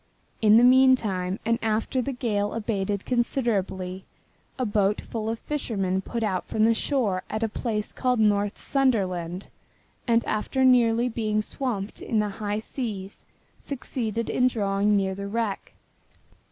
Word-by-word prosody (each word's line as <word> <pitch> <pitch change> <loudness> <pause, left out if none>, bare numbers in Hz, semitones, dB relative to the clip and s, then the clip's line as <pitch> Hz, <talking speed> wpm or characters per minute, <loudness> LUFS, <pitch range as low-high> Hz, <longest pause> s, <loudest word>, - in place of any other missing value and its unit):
In 215 0 +6
the 235 - +6
meantime, 240 -8 +4
and 230 0 +1
after 225 +3 0
the 275 - -3
gale 210 -5 -1
had 230 - -4
abated 200 -2 -2
considerably, 200 -7 -1 0.5
a 255 - 0
boat 205 -1 +1
full 220 -1 -4
of 225 - -2
fishermen 200 -10 -2
put 230 +3 -4
out 190 -4 -1
from 215 - +2
the 230 - +5
shore 225 -7 0
at 215 +1 -2
a - - +2
place 215 -1 -3
called 250 -2 0
North 205 -1 +2
Sunderland 190 -9 0 0.6
and 235 -1 +3
after 260 +5 0
nearly 240 -2 +4
being 215 -3 -1
swamped 220 -6 -4
in 225 - -1
the 210 -1 +1
high 205 +1 -3
seas 215 -4 -5 0.4
succeeded 230 -4 -3
in 250 - +2
drawing 205 -3 +1
near 190 -1 0
the 200 +1 -5
wreck. 215 -1 -3
215 Hz, 150 wpm, -25 LUFS, 200-240 Hz, 0.6 s, In